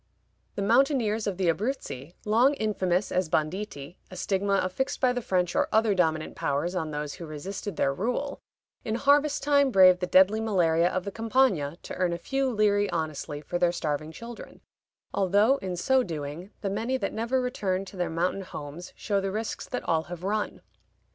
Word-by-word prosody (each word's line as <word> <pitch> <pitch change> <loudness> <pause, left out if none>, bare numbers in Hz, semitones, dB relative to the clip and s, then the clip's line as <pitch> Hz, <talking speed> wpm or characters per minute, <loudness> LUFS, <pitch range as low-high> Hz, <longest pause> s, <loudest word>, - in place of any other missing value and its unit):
The 200 - -2
mountaineers 230 -2 +2
of 195 -3 -2
the 190 -2 0
Abruzzi, 170 - -2
long 240 +7 +4
infamous 195 -5 0
as 180 -3 0
banditti 155 -1 -3
(a 185 - -10
stigma 195 +1 0
affixed 225 +10 -2
by 255 -2 +3
the 245 - -2
French 180 -4 0
or - - +2
other 220 -1 +3
dominant 160 -4 0
powers 145 +6 -1
on 165 -4 -2
those 150 -1 -4
who 170 - -8
resisted 185 +5 -6
their 135 - +1
rule), 250 - -2 0.4
in 220 - -2
harvest 285 +3 +3
time 280 -1 +4
brave 185 -5 +6
the 180 - -2
deadly 190 +5 +5
malaria 175 -6 +2
of 185 - -2
the 200 - -3
Campagna 225 - +1
to - - -7
earn 180 -1 +1
a - - -2
few 270 +8 -1
liri 205 -2 +2
honestly 155 -2 -3
for 175 +4 -3
their 175 -1 +3
starving 155 -2 -3
children, 230 +7 -10 0.5
although 205 +7 +3
in 185 -7 -4
so 265 +8 +3
doing 160 - -5
the 200 - -1
many 230 +6 -1
that - - -3
never 235 +4 0
return 195 -7 -1
to 195 - -12
their 180 -1 -1
mountain 175 +4 -1
homes 165 -1 -8
show 200 -2 -1
the 195 0 -2
risks 220 +2 -4
that 250 - -3
all 160 -1 +1
have 175 0 -8
run. 210 +2 -2
190 Hz, 185 wpm, -27 LUFS, 170-225 Hz, 0.5 s, brave